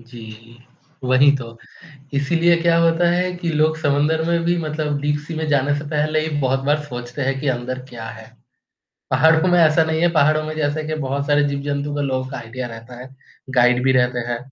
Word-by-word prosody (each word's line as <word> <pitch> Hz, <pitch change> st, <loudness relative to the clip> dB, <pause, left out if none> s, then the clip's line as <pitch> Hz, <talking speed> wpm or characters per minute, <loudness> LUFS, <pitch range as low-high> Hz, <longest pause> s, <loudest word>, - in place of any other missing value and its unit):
जी, 115 Hz, -1 st, -13 dB, 0.5 s
वही 130 Hz, +3 st, +5 dB
तो। 115 Hz, -3 st, -9 dB, 0.6 s
इसीलिए 165 Hz, +5 st, +2 dB
क्या 170 Hz, 0 st, +3 dB
होता 170 Hz, +1 st, +3 dB
है 180 Hz, +1 st, 0 dB
कि 175 Hz, -1 st, -4 dB
लोग 155 Hz, +1 st, +1 dB
समुन्दर 150 Hz, +1 st, +1 dB
में 170 Hz, 0 st, +1 dB
भी 175 Hz, +1 st, +1 dB
मतलब 150 Hz, -2 st, -2 dB
डीप 145 Hz, 0 st, 0 dB
सी 165 Hz, -, -6 dB
में 160 Hz, 0 st, -3 dB
जाने 145 Hz, 0 st, +2 dB
से 150 Hz, -, -8 dB
पहले 155 Hz, +1 st, 0 dB
ही -, -, -3 dB
बहुत 135 Hz, 0 st, +1 dB
बार 150 Hz, +1 st, +1 dB
सोचते 125 Hz, -1 st, -7 dB
हैं 135 Hz, 0 st, -1 dB
कि 145 Hz, -, -4 dB
अंदर 130 Hz, +1 st, -3 dB
क्या 115 Hz, -2 st, -8 dB
है। -, -, -11 dB, 0.8 s
पहाड़ों 160 Hz, +2 st, +4 dB
में 175 Hz, -, +4 dB
ऐसा 160 Hz, 0 st, +4 dB
नहीं 160 Hz, 0 st, -1 dB
है 175 Hz, -, +4 dB
पहाड़ों 155 Hz, -1 st, +3 dB
में 155 Hz, -, -5 dB
जैसे 155 Hz, 0 st, -1 dB
कि 155 Hz, -, -1 dB
बहुत 140 Hz, +1 st, -2 dB
सारे 145 Hz, 0 st, +3 dB
जीव-जंतु 140 Hz, +1 st, -3 dB
के 145 Hz, -, -2 dB
लोगों 130 Hz, -1 st, -2 dB
का 135 Hz, -, -6 dB
आईडीया 125 Hz, +2 st, -6 dB
रहता 115 Hz, +1 st, -11 dB
है। 130 Hz, -, -9 dB, 0.5 s
गाइड 125 Hz, 0 st, +4 dB
भी 130 Hz, -, +4 dB
रहते 125 Hz, -1 st, +1 dB
हैं। 120 Hz, -, -1 dB
145 Hz, 205 wpm, -20 LUFS, 130-155 Hz, 0.8 s, वही